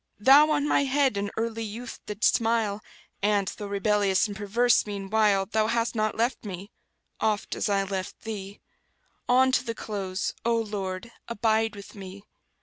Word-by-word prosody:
Thou 275 +8 +7
on 295 -1 +1
my 280 - +3
head 270 -3 +2
in 200 0 -2
early 225 0 -2
youth 225 +3 -7
didst 210 +1 +2
smile, 225 -3 0 0.4
And, 200 -1 +2
though 205 - -6
rebellious 200 0 +2
and 205 - -7
perverse 215 +4 +2
meanwhile 200 0 +1
Thou 215 +1 0
hast 230 +1 0
not 215 -2 -1
left 235 +3 0
me, 200 0 -7 0.5
oft 215 -2 0
as - - -1
I 200 -1 +2
left 190 -1 -5
Thee; 205 -2 -7 0.7
On 260 +1 +5
to 255 - +2
the 230 -2 -4
close, 195 -4 -3
O 235 0 +2
Lord, 205 -1 -4 0.2
abide 225 -1 +1
with 200 -1 -11
me! 195 0 -10
215 Hz, 160 wpm, -26 LUFS, 200-230 Hz, 0.7 s, Thou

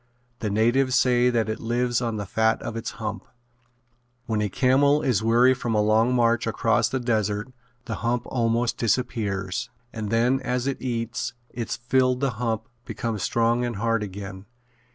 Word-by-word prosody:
The 110 - -2
natives 120 +5 +2
say 125 -1 +4
that 115 -3 +1
it 110 +1 -3
lives 120 +1 0
on 115 -2 -2
the 100 - -3
fat 110 +3 +1
of - - -5
its 115 - -3
hump. 105 -3 -4 1.0
When 110 -2 -1
a 105 - 0
camel 140 +7 +3
is 125 -8 +2
weary 120 +3 +5
from 120 -3 -2
a 105 - +3
long 110 +4 +3
march 115 -1 +2
across - - +2
the 130 - -1
desert 110 0 -1 0.3
the 115 - -4
hump 120 +1 0
almost 120 -1 0
disappears 100 -5 -1 0.2
and 110 -2 -4
then 120 +4 +2
as 125 -1 -2
it 135 -1 -2
eats 120 0 -3 0.2
its 120 -2 -3
fill 130 +1 +2
the 135 +1 -1
hump 115 -2 -1 0.2
becomes 115 -4 -4
strong 115 +4 +1
and 120 -2 -2
hard 115 +1 0
again. 95 -1 -7
115 Hz, 170 wpm, -25 LUFS, 110-125 Hz, 1.0 s, weary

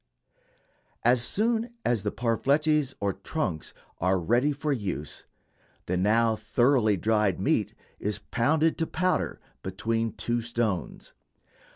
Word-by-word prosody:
As 120 0 +5
soon 230 - 0
as 120 -4 +2
these 105 +1 -2
parfleches, 140 +4 +1
or 100 -1 0
trunks, 95 - -3 0.3
are 95 +2 +2
ready 120 - +2
for 145 +1 -1
use, 95 - -4 0.6
the 90 - -1
now 110 +4 +3
thoroughly 110 0 +2
dried 105 -1 +1
meat - - +1 0.2
is 105 0 -2
pounded 150 +9 +1
to 165 - 0
powder 185 0 0 0.2
between 115 +4 -2
two 120 0 -1
stones. 115 -5 -3
115 Hz, 115 wpm, -27 LUFS, 105-145 Hz, 0.6 s, As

